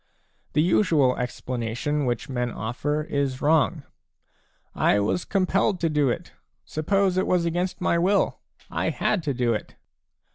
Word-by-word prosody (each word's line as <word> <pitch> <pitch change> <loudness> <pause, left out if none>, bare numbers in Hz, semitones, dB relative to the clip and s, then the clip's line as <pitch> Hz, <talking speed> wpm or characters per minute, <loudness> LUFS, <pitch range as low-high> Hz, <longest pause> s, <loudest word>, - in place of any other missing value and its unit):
The 150 - +3
usual 160 -7 +3
explanation 125 +3 -2
which 120 -2 -2
men 125 -2 -2
offer 135 +8 -2
is 140 -3 -2
wrong: 155 0 +2 0.5
" - - -41 0.2
I 105 - +4
was 105 - 0
compelled 195 0 +1
to 165 - +2
do 150 -3 +2
it. - - -4 0.3
Suppose 190 +4 +1
it 185 - +1
was 180 -2 +2
against 175 +3 -2
my 170 -1 +2
will; 195 +4 +2 0.3
I - - 0
had 205 - 0
to 150 -3 -2
ilo 120 -2 +1
it." 105 - -5
150 Hz, 150 wpm, -25 LUFS, 125-175 Hz, 0.5 s, I